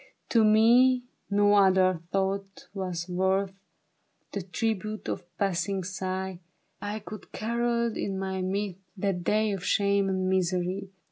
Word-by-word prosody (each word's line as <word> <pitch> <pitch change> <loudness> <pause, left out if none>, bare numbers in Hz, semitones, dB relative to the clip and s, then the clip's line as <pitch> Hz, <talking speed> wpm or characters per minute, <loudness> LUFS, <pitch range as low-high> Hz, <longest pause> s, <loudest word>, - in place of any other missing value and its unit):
To 230 -2 +4
me 240 +4 +5 0.3
no 205 0 +4
other 190 -3 +4
thought 195 0 -2
was 180 -3 -3
worth 190 +2 +1 0.8
The 200 - -3
tribute 215 +3 -3
of - - -2
a - - -25
passing 190 0 0
sigh; 190 0 -4 0.4
I 205 +1 -3
could 215 0 -9
have - - -36
carolled 235 0 0
in 195 -1 -2
my 190 0 -2
mirth, 195 0 -2 0.2
That 185 -2 -1
day 215 +3 +2
of 195 -3 -4
shame 200 -1 +2
and 185 -1 0
misery. 185 +1 0
195 Hz, 140 wpm, -28 LUFS, 185-210 Hz, 0.8 s, me